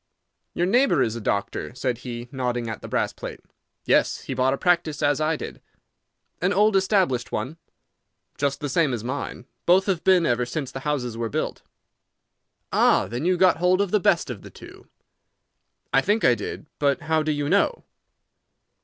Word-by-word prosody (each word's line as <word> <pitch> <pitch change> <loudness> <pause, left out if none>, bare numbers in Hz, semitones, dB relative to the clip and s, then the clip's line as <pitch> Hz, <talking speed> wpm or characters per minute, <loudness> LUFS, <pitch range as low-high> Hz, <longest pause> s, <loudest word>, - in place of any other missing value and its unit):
"Your 175 - +1
neighbour 200 - +3
is 110 - -2
a 115 - -5
doctor," 100 +3 -2
said 125 -2 -2
he, 120 -1 -6
nodding 125 -3 -2
at 110 -2 -5
the - - -8
brass - - -1
plate. - - -8 0.5
"Yes; - - +2
he - - -5
bought 130 +1 +2
a - - -10
practice 170 -4 +1
as 145 +1 +2
I 155 +1 +1
did." - - -8 0.8
"An 180 +2 +2
old 210 +1 +3
established 190 - +1
one?" 130 +10 -3 0.8
"Just 140 0 -1
the 145 - -2
same 150 -1 +1
as 110 - -6
mine. 130 -1 -5 0.2
Both 185 +2 +5
have 185 -5 -1
been 185 -3 +4
ever 120 -2 +1
since 135 +2 -4
the 135 - -6
houses 125 -6 -2
were 115 -1 -2
built." - - -3 1.1
"Ah! - - +4
Then 120 +7 -4
you 180 0 +2
got 185 -1 +4
hold 180 +2 +3
of 200 -2 0
the 210 - +3
best 170 -6 +2
of 105 -6 -7
the - - -11
two." - - -14 1.1
"I 135 - +5
think 210 +8 +1
I 125 - +6
did. 110 +6 -5
But 140 -2 +1
how 160 0 +1
do 155 0 0
you 145 -1 -1
know?" 200 - +2
145 Hz, 185 wpm, -24 LUFS, 125-180 Hz, 1.1 s, I